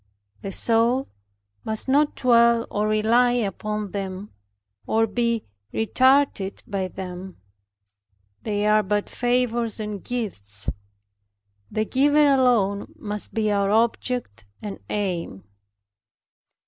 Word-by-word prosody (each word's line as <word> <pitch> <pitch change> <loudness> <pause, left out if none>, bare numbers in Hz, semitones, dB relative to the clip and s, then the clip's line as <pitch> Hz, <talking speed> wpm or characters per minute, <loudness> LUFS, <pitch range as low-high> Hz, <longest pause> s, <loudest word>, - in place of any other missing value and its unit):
The 195 - -5
soul 235 +6 +1 0.5
must 220 +3 -3
not 290 +3 +3
dwell 235 -2 +4
or 210 0 0
rely 225 +3 +3
upon 210 -2 -2
them, 195 0 -5 0.6
or 225 +1 +3
be 235 +1 -1 0.3
retarded 260 -3 +2
by 195 -2 -2
them; 185 0 -8 1.0
they 205 -1 -1
are 215 0 +4
but 205 +1 -1
favors 240 -2 0
and 210 -2 -5
gifts. 105 - -3 1.0
The 215 - -1
Giver 290 +5 +3
alone 225 -7 +2
must 210 -1 -5
be 215 -1 +1
our 200 -1 +1
object, 230 - 0 0.2
and 205 -2 -7
aim. 180 - -3
215 Hz, 105 wpm, -24 LUFS, 200-240 Hz, 1.0 s, dwell